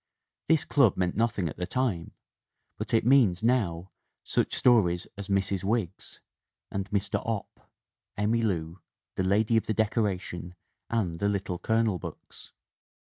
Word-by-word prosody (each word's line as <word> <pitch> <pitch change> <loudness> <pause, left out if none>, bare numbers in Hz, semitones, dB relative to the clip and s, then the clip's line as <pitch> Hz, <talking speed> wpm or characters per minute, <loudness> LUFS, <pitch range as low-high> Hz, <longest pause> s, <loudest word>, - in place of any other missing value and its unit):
This 160 -2 +3
club 135 -9 +3
meant 90 -1 0
nothing 110 -5 0
at 75 - -6
the 90 0 -3
time, 110 -7 -2 0.6
but - - -4
it 115 -1 +2
means, 115 -8 +4
now, 95 -8 +1 0.3
such - - 0
stories 90 -8 +3
as 100 -1 -7
Mrs. 95 -1 0
Wiggs 100 -3 -3 0.5
and 100 0 -3
Mr. 100 -1 -1
Opp, 115 -4 -5 0.5
Emmy 110 +3 +1
Lou, 85 -5 -2 0.3
The 95 - -1
Lady 105 +4 +3
of 110 - 0
the 110 - 0
Decoration 95 -5 -1 0.3
and 90 -8 -1
the 100 - +1
Little 100 -3 -2
Colonel 110 -2 +1
books. - - -10
100 Hz, 140 wpm, -28 LUFS, 90-115 Hz, 0.6 s, means